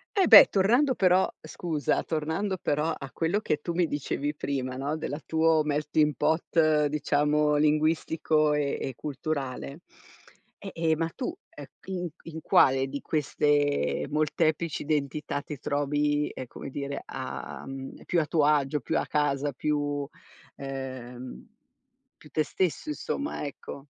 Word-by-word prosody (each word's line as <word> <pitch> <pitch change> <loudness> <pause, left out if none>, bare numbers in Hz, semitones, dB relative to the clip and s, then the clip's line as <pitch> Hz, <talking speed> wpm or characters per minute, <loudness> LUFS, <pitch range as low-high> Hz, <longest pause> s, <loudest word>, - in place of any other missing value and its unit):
E 385 -2 +4
beh, 220 - +11
tornando 245 +8 +3
però 185 -1 +3
scusa, 155 -6 -2
tornando 160 +5 -2
però 150 +2 0
a 135 -1 -8
quello 170 +5 0
che 155 -8 0
tu 170 - -3
mi 175 +1 +2
dicevi 145 -1 -2
prima, 130 -3 -3
no, 140 +4 -2
della 145 -1 -4
tuo 160 -1 +3
melting 150 0 +1
pot 155 -1 +2
diciamo 150 0 +1
linguistico 155 0 +2
e 145 -1 0
e 135 - -4
culturale, 140 0 -4 0.8
e, 195 - -8
ehm, 160 -1 +1
ma 165 +1 -1
tu, 275 +6 -3
ehm, - - -11 0.2
in 185 -2 -3
q 170 - -22
in 160 0 -7
quale 135 -2 +4
di 140 +1 -5
queste 145 -1 +1
molteplici 155 +2 0
identità 145 0 -2
ti 150 -4 -7
trovi, 145 +1 0
ehm, 130 - -7
come - - -8
dire 140 0 -4
a 130 -1 -6
mhmm, 135 0 -8
più 175 - +1
a 155 - +1
tuo 150 -1 +2
agio, 145 -1 +2
più - - -1
a - - -2
casa, 145 -1 0
più 145 0 -1 0.5
ehm, 130 - -7 0.7
più 150 - -16
te 155 - +1
stesso 185 - -2
insomma, 295 - -3
ecco? 140 -1 -8
150 Hz, 145 wpm, -27 LUFS, 140-160 Hz, 0.8 s, beh